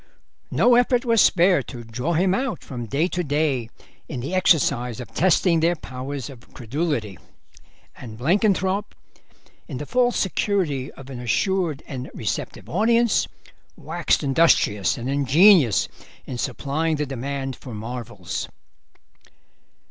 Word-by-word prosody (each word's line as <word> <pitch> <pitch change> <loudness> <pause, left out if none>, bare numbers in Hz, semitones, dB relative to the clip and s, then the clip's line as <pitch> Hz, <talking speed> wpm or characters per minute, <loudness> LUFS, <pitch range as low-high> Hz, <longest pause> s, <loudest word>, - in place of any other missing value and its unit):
No 245 - +4
effort 245 +1 +3
was 230 -3 +4
spared 175 -6 +4
to 120 -3 -8
draw 125 +9 -3
him 180 +3 +2
out 255 +3 -2
from 120 -3 -6
day 145 +10 +1
to 180 0 -2
day 145 -6 0 0.4
in 140 - -4
the 140 +9 -5
exercise 130 -10 +2
of 120 -3 -9
testing 180 -1 +3
their 170 +2 +2
powers 135 -2 -6
of 130 -4 -14
credulity, 120 - -3 0.8
and 110 -3 -10
Blenkinthrope, 190 - +1 0.7
in 140 - -6
the 150 - -5
false 245 - +1
security 175 -9 -1
of 135 0 -12
an 125 - -7
assured 160 - 0
and 130 -2 -6
receptive - - -4
audience, 230 +4 +2 0.5
waxed 165 0 0
industrious 135 - +3
and 120 - -5
ingenious 140 - +5 0.4
in 125 - -6
supplying 155 +6 -1
the 150 0 -1
demand 135 0 -4
for 125 -5 -9
marvels. 115 -4 -6
145 Hz, 130 wpm, -23 LUFS, 125-180 Hz, 0.8 s, ingenious